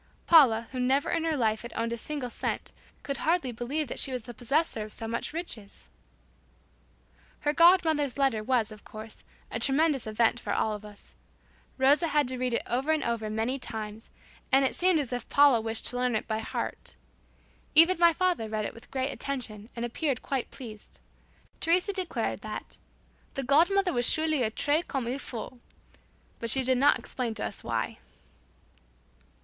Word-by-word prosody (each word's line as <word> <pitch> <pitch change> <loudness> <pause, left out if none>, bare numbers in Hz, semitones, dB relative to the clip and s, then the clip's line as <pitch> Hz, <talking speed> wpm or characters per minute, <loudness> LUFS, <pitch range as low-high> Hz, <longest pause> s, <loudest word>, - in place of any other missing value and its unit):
Paula, 235 -9 +6
who 255 - -4
never 265 +3 +1
in 330 - 0
her 320 -2 0
life 220 -3 +1
had 235 - -8
owned 230 0 -1
a - - -1
single 260 0 -4
cent, - - -3 0.3
could 275 - -3
hardly 325 -5 +1
believe 265 +6 -3
that - - -2
she 270 - +3
was 250 -3 -3
the 240 - -9
possessor 255 +2 0
of 210 - -5
so 225 - -6
much 230 +1 -2
riches! 265 - -6 1.5
Her 295 0 +1
godmother's 320 -5 +4
letter 265 -6 +1
was, 230 -2 +1
of 210 -1 -12
course, 215 0 -10 0.3
a - - -2
tremendous 280 -3 +2
event 225 +2 +2
for - - -3
all 215 - 0
of 210 0 -7
us. 210 -1 -12 0.6
Rosa 285 +5 +4
had 295 -3 +2
to 255 -1 -3
read 250 -2 0
it - - -1
over 260 +6 0
and 315 -1 +1
over 230 -2 -2
many 225 +5 -1
times, 220 -2 -6 0.4
and 270 +1 +5
it - - 0
seemed 360 -2 +3
as 265 -4 -3
if 245 - -4
Paula 280 -5 +5
wished 225 0 -2
to 245 - -4
learn 250 -2 +1
it 215 - -2
by 220 -1 -1
heart. 220 - -5 0.8
Even 335 +3 +6
my 340 -1 +7
father 345 -10 0
read 215 -1 -2
it - - -4
with 230 - -14
great 265 +1 -2
attention 240 -7 -5
and 235 0 -2
appeared 260 +2 -2
quite 270 -3 -2
pleased. 220 -5 -11 0.6
Teresa 360 +5 +2
declared 375 -3 -2
that - - -7 0.6
"The 275 - -2
god 285 +7 +4
mother 395 -2 +1
was 245 -1 +3
surely 315 -3 +1
a 225 - +2
'très 295 +8 0
comme 270 -4 -2
il 250 +4 -3
faut,'" 240 -1 -7 0.8
but 230 - -2
she 265 +3 +4
did 255 0 +2
not 285 +2 +5
explain 240 -4 -4
to 215 - -2
us - - -6
why. 115 -1 -2
255 Hz, 185 wpm, -28 LUFS, 225-295 Hz, 1.5 s, my